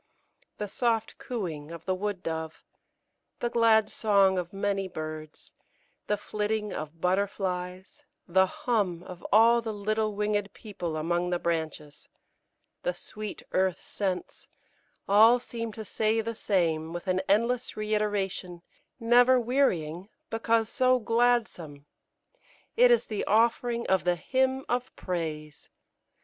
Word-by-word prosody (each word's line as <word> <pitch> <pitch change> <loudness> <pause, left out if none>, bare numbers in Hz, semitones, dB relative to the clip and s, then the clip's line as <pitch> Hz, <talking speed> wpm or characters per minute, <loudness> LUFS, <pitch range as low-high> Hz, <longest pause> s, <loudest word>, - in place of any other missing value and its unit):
The 210 - -3
soft 225 +1 -1
cooing 165 -11 -5
of 165 -1 -9
the 185 - +1
wood 195 0 -3
dove, 160 -1 -5 0.7
the 240 - -1
glad 225 -2 +4
song 200 -4 +3
of 175 -1 -5
many 195 -1 -1
birds, 155 -3 -8 0.5
the 210 - +1
flitting 210 0 -2
of 155 +2 -6
butterflies, 185 - -2 0.3
the 190 +1 +4
hum 190 -6 -1
of 180 -1 -10
all 230 +3 +6
the 225 -1 -4
little 215 +1 -1
winged 205 -1 -1
people 175 -7 -5
among 175 +3 0
the 175 - +1
branches, 160 -3 -4 0.7
the - - -1
sweet 215 -1 -7
earth 185 -1 0
scents 190 -3 -4 0.6
all 220 +5 +6
seem 230 -2 -5
to 220 0 -7
say 220 +3 0
the 230 +1 -2
same, 165 -7 0
with 175 - -6
an 185 0 +1
endless 235 +5 +1
reiteration, 205 -4 -2 0.4
never 245 +2 +5
wearying 195 - 0 0.2
because 225 0 +1
so 255 +1 +3
gladsome. 225 - 0 0.9
It - - +6
is 480 -1 +4
the 215 - -3
offering 235 +2 +2
of 190 -1 +2
the 180 0 +2
Hymn 260 +7 0
of 245 +1 -1
Praise! 155 -4 -5
205 Hz, 130 wpm, -28 LUFS, 175-230 Hz, 0.9 s, all